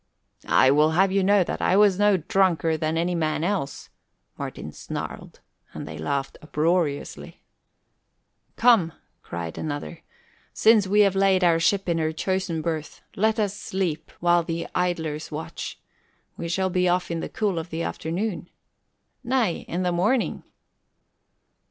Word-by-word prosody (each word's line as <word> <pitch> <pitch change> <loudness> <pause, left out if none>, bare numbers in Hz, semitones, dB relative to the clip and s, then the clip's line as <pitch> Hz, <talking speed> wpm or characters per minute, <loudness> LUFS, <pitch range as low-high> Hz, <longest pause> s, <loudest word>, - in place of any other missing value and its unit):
"I 130 - +5
will 150 +2 +4
have 190 +1 +4
you 195 +1 +2
know 200 0 +4
that - - -4
I 185 - +3
was 205 -2 +4
no 205 -1 +4
drunker 170 -1 +1
than 155 +1 -1
any 175 +2 0
man 155 -2 -1
else," 175 -7 -2 0.5
Martin - - -6
snarled, - - -7 0.3
and - - -6
they 75 +1 -7
laughed 135 - -3
uproariously. 155 -1 -1 1.1
"Come," 225 -9 +4 0.3
cried 85 -1 -6
another, 155 +2 -5 0.5
"since 220 -3 +4
we 205 +2 +4
have 200 -2 +4
laid 195 -1 +3
our 170 -2 +4
ship 195 +4 +1
in 170 -1 +1
her 155 0 0
chosen 175 -1 -2
berth, 160 -2 -4
let 220 +3 +2
us 205 -2 0
sleep 185 -6 -3
while 175 0 +4
the 165 0 -4
idlers 165 -4 -2
watch. 155 +2 -6 0.6
We 170 - -5
shall 190 +2 0
be 180 0 +2
off 180 0 0
in 165 - -2
the - - -5
cool 200 -6 -1
of 165 +2 -7
the 165 +1 -3
afternoon." 175 +2 -3 0.7
"Nay, 240 -8 0
in 180 +2 -2
the 180 - +1
morning!" 210 +9 +1
175 Hz, 150 wpm, -24 LUFS, 160-195 Hz, 1.1 s, I